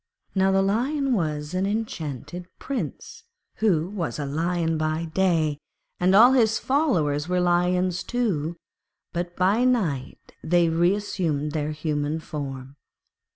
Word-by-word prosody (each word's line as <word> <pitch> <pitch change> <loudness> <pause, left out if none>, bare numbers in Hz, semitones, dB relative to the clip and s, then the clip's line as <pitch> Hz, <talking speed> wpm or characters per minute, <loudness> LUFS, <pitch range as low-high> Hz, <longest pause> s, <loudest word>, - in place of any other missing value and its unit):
Now 190 0 +3
the 195 0 +3
Lion 260 +7 0
was 155 -5 -2
an 185 +1 0
enchanted 175 - -4
Prince, 275 -2 -5 0.3
who 180 -7 +2
was 180 - -4
a 145 - -3
Lion 165 +3 -1
by 155 +1 -1
day, 160 -3 +1 0.4
and 185 +2 +3
all 240 +5 +8
his 225 -4 +3
followers 175 - +1
were 180 0 +1
Lions 180 +1 +1
too; 180 -10 -1 0.6
but 175 0 -3
by 195 +6 +2
night 190 - -1
they 170 0 +3
reassumed 170 -3 0
their 150 -1 -2
human 150 0 -2
form. 140 -3 -7
175 Hz, 125 wpm, -25 LUFS, 155-195 Hz, 0.6 s, all